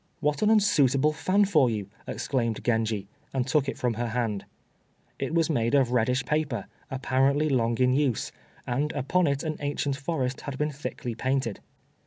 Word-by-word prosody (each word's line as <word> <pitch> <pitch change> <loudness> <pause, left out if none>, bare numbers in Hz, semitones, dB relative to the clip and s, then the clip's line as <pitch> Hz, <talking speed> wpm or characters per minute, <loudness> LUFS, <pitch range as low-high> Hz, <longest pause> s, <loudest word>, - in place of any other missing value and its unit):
"What 150 -2 0
an 210 - +4
unsuitable 150 - +4
fan 190 +6 +2
for 155 -10 +4
you!" 105 -4 -3 0.2
exclaimed 115 -5 -2
Genji, 110 -4 0 0.3
and 130 -2 +1
took 135 0 +1
it - - -5
from 125 -2 0
her 120 +2 -2
hand. 115 -4 -2 0.7
It 160 - -2
was 165 -2 +3
made 120 -4 +1
of 130 -4 +3
reddish 125 +2 +1
paper, 150 -8 -1 0.2
apparently 135 +2 +1
long 120 -4 +1
in 125 0 +3
use, 135 -4 0 0.3
and 140 +5 -1
upon 160 +6 +1
it 140 0 0
an 155 -2 -3
ancient 145 -1 -1
forest 135 -3 -2
had 140 -2 -6
been 150 +1 0
thickly 135 -4 -5
painted. 130 -2 -1
135 Hz, 170 wpm, -27 LUFS, 120-150 Hz, 0.7 s, an